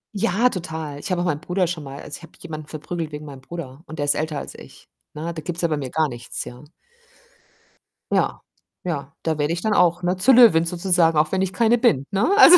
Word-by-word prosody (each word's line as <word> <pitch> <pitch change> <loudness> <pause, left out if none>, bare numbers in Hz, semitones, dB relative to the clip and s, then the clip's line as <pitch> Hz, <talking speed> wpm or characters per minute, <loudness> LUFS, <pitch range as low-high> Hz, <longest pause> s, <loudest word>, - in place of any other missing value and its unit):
Ja, 215 +4 +3
total. 160 -6 -5
Ich - - -6
habe 175 -1 +1
auch - - -1
meinen 150 -2 -1
Bruder 180 0 0
schon 165 -3 -4
mal 135 0 -8
also, 145 - -6
ich - - -17
habe 165 - -13
jemanden 155 -3 -7
verprügelt 160 +1 -5
wegen 150 +1 -7
meinem 135 -2 -10
Bruder 155 -1 -8
und 160 - -8
der 145 - 0
ist 145 - +4
älter 155 -1 -2
als - - -6
ich, - - -14 0.3
ne? 165 +3 -4
Da 160 - -6
gibt's 175 +2 -4
ja - - +4
bei 155 - 0
mir 135 -3 -4
gar 155 +2 +1
nichts, 120 -2 -6
ja? 125 +4 -10 1.5
Ja, - - +1 0.4
ja, 140 -6 -3
da 160 -2 0
werde 150 +3 +1
ich 175 - -3
dann 215 -1 +1
auch, 175 -1 +3
ne, 180 +1 +1
zur 220 +8 +5
Löwin 195 -10 +7
sozusagen, 170 -2 +2
auch 155 0 +3
wenn 190 0 +1
ich 190 0 -1
keine 230 +4 +4
bin, 185 - +3
ne? 200 - +2
Also. 360 -3 +11
165 Hz, 240 wpm, -23 LUFS, 150-180 Hz, 1.5 s, Also